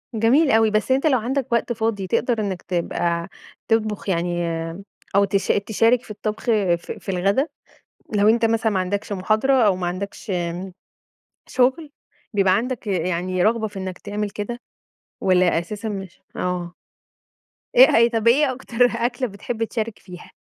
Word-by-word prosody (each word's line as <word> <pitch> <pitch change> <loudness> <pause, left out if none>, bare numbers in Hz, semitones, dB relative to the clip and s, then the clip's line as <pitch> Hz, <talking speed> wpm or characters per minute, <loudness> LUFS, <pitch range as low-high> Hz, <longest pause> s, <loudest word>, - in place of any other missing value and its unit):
جميل 255 +8 +4
أوي، 225 -1 +4
بس 215 +4 0
أنت 270 +4 +3
لو 265 -5 +3
عندك 255 +3 -2
وقت 235 +1 +1
فاضي، 220 -4 -2
تقدر 240 +4 0
إنّك 190 -4 -3
تبقى 170 -1 -2 0.4
تطبخ 220 -1 0
يعني 175 -1 0 0.7
أو 200 0 +5
تش 195 -1 -1
تشارك 225 +4 +2
في 225 - -11
الطّبخ 215 +1 -4
في 205 -7 +2 0.2
في - - -10
الغدا؟ 195 - +1 0.7
لو 205 +1 +4
أنت 230 +1 +3
مثلًا 225 -1 +2
ما 190 - +1
عندكش 200 +3 -3
مُحاضرة، 215 +7 +1
أو 195 -3 +3
ما 180 -1 -3
عندكش 200 +4 -5
امم 180 +1 -3 0.8
شُغل، 265 +4 +1 0.4
بيبقى 195 -2 +3
عندك 240 +1 -3
يعني 180 0 -1
رغبة 220 +1 +2
في 205 -2 -8
إنّك 185 -1 -5
تعمل 205 0 -4
كده، 215 +4 -5 0.6
والّا 185 -3 +3
أساسًا 205 +6 -5
مش 195 -3 -7 0.2
آه. 180 -1 -3 1.0
إيه - - +8
هيت 235 +1 +4
طب 225 0 0
إيه 270 +3 +4
أكتر 245 -1 +1
أكلة 245 +1 -1
بتحب 220 +2 -4
تشارك 225 -1 -3
فيها؟ 180 -2 -12
210 Hz, 155 wpm, -22 LUFS, 185-235 Hz, 1.0 s, إيه